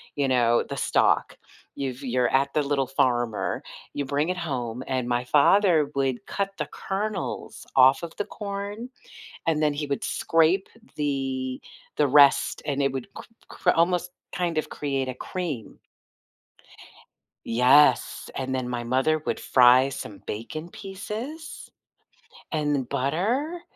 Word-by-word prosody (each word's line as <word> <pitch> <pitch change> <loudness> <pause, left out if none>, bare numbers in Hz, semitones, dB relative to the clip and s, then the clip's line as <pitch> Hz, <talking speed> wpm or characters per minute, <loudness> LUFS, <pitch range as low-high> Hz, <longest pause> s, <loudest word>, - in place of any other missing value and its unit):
you 140 -2 0
know, 120 -2 +3
the - - -7
stalk. - - +2 0.4
You've 130 -1 -4
you're 125 -1 +1
at 135 +1 +1
The 150 - +2
Little 140 -2 0
Farmer, 120 -4 0 0.3
you 145 - -2
bring 145 +4 0
it 185 - -1
home, 125 -7 -3
and 130 -2 -1
my 120 +1 0
father 155 +2 +4
would 135 -3 -1
cut 200 0 -2
the - - -4
kernels 195 0 -4
off 130 +1 +6
of 170 -1 -7
the - - -2
corn, 205 +3 -6 0.6
and 155 -2 +1
then 150 - +3
he 145 +1 -3
would 140 -1 -3
scrape 165 +4 +2 0.3
the 135 -3 -2 0.3
the 150 - +3
rest, 140 0 +5
and 140 -2 0
it 140 -1 +1
would 135 -2 -5
cr - - -8 0.3
cr - - +1
almost 180 +1 +1 0.2
kind 175 -3 -1
of 155 - -2
create 135 -2 -2
a 130 - -3
cream. 150 - -5 1.7
Yes, 125 +5 +4
and 130 0 -2
then 130 -1 -2
my 120 -1 -3
mother 130 +6 +1
would 155 - -3
fry 125 +1 +5
some 120 -6 -7
bacon 135 +10 -6
pieces 220 - -7 0.8
and 145 -5 -1
butter, 205 - -1
140 Hz, 140 wpm, -25 LUFS, 130-170 Hz, 1.7 s, off